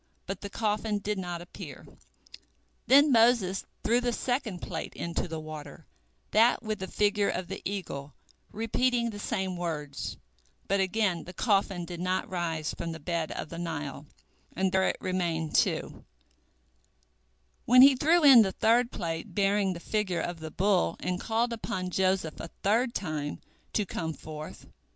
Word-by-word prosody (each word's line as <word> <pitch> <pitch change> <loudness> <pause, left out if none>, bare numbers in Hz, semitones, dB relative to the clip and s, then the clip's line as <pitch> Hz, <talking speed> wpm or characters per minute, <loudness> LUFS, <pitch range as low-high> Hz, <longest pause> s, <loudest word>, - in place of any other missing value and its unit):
But 195 0 -5
the 200 - -5
coffin 210 0 -1
did 205 0 -2
not 175 -2 -4
appear. 175 - -10 1.0
Then 285 +2 +7
Moses 225 -5 +4 0.2
threw 235 +3 +3
the 245 0 0
second 240 -7 -2
plate 165 -2 -5
into 170 +1 -3
the 160 -1 -5
water, 155 +1 -9 0.5
that 230 +4 +4
with 215 -2 -3
the 190 - -4
figure 205 0 +1
of 180 -2 -3
the 195 - -5
eagle, 150 -8 -5 0.4
repeating 235 +2 0
the 205 - -8
same 190 -4 -2
words, 150 -5 -4 0.5
but 200 +1 +2
again 190 -3 +1
the 180 - -9
coffin 195 -5 +1
did 175 0 -7
not 185 +1 -1
rise 165 -4 -2
from 165 -1 -4
the 160 - -8
bed 170 -2 -2
of - - -5
the 170 - -7
Nile, 150 -4 -5 0.5
and 190 +1 +1
there 190 0 +3
it - - -1
remained, 170 -4 -1
too, - - +1 1.6
when 250 +2 +8
he 275 0 +8
threw 320 +6 +3
in 270 -5 +10
the 190 -3 +1
third 235 +2 +3
plate 165 +3 -4
bearing 200 -1 +2
the 170 - -7
figure 190 -2 -1
of 175 0 -3
the 160 0 -6
bull, 185 0 +2
and 180 0 -2
called 230 +2 0
upon 185 -5 -3
Joseph 185 -4 0
a - - -5 0.2
third 235 +5 +2
time 155 -5 -3 0.3
to 210 - +1
come 160 -3 -3
forth. 155 0 -9
190 Hz, 160 wpm, -29 LUFS, 170-220 Hz, 1.6 s, in